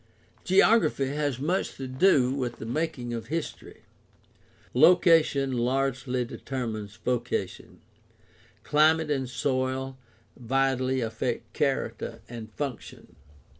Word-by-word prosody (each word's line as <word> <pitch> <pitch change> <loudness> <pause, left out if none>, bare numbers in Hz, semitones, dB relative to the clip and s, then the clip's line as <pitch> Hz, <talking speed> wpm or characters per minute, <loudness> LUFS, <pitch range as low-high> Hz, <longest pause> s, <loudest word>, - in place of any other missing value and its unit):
— - - -33
Geography 185 - +4
has 145 -2 -1
much 170 +8 -1
to 135 - -5
do 130 -2 +3
with 125 -3 -3
the 110 - -8
making 125 -1 -3
of 115 -1 -5
history. 165 +2 -5 0.9
Location 155 -2 +5
largely 130 0 0
determines 110 -5 -5
vocation; 120 -4 -3 0.8
climate 155 +1 +3
and 135 -3 -1
soil 130 +1 -2 0.4
vitally 130 +1 0
affect 115 +1 -3
character 135 -2 -2
and 115 -2 -8
function. 140 -5 -6
130 Hz, 100 wpm, -27 LUFS, 120-145 Hz, 0.9 s, Location